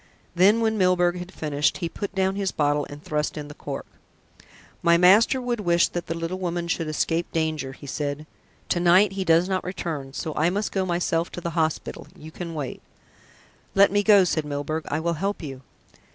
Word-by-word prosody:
Then, 200 +6 +4
when 220 -1 +1
Milburgh 180 -1 +3
had 180 +1 -8
finished, 150 -4 0
he 170 - -2
put 200 +4 -6
down 190 0 +1
his 195 -1 -1
bottle 145 -1 0
and 145 +1 -10
thrust 150 +1 -2
in 150 -1 -6
the - - -8
cork. - - -6 1.0
"My 170 0 +5
master 205 +9 +5
would 245 -2 -2
wish 175 -3 +3
that 175 - -5
the 165 - -2
little 165 +3 -3
woman 175 -1 -2
should 165 -1 -1
escape 165 +2 -1
danger," 155 -4 -2
he 140 - -13
said. 145 +1 -3 0.4
"To 175 - +1
night 180 +3 +5
he 195 0 -3
does 165 0 +4
not 190 -1 -1
return, 160 -7 -5
so 155 - -4
I 160 +3 +2
must 205 +3 -2
go 190 -1 -1
myself 170 -1 0
to 175 - -6
the 170 - -3
hospital 160 -1 -2
you 155 +1 -11
can 170 0 -6
wait." 140 -4 -5 0.9
"Let 200 0 +6
me 205 0 +3
go," 205 -2 +6
said 160 -3 0
Milburgh. 150 +2 -3
"I 150 - -1
will 170 +1 0
help 200 -2 -2
you." 135 -3 -7
170 Hz, 200 wpm, -24 LUFS, 155-190 Hz, 1.0 s, Let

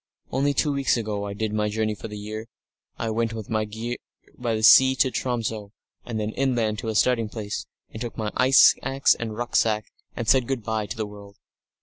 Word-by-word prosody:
Only 140 +2 +1
two 145 +2 +1
weeks 140 -3 +1
ago 105 -3 -3
I 100 - -5
did 110 0 -2
my 105 0 0
journey 110 0 -1
for 105 - -8
the 105 -1 -8
year. 110 +2 -6 0.5
I 115 - -2
went 115 0 -1
with 110 -1 -7
my 110 -1 +1
gear 115 +3 -5 0.4
by 115 -3 -2
sea 130 +4 +7
to 130 0 +2
Tromso, 110 -5 -3 0.3
and 115 -2 -3
then 105 0 -2
inland 115 -5 0
to - - -5
a 110 - -2
starting 115 -1 +2
place, 105 -2 -5 0.2
and 110 - -8
took 120 -1 -5
my 110 -1 -2
ice 130 +1 +7
axe 135 +1 +3
and 110 -2 -5
rucksack, 110 -3 +1 0.3
and 115 - -4
said 130 0 +4
good 130 -4 -2
bye 110 -1 -2
to 105 - -6
the 110 - -2
world. 100 -1 -12
110 Hz, 210 wpm, -24 LUFS, 105-120 Hz, 0.5 s, sea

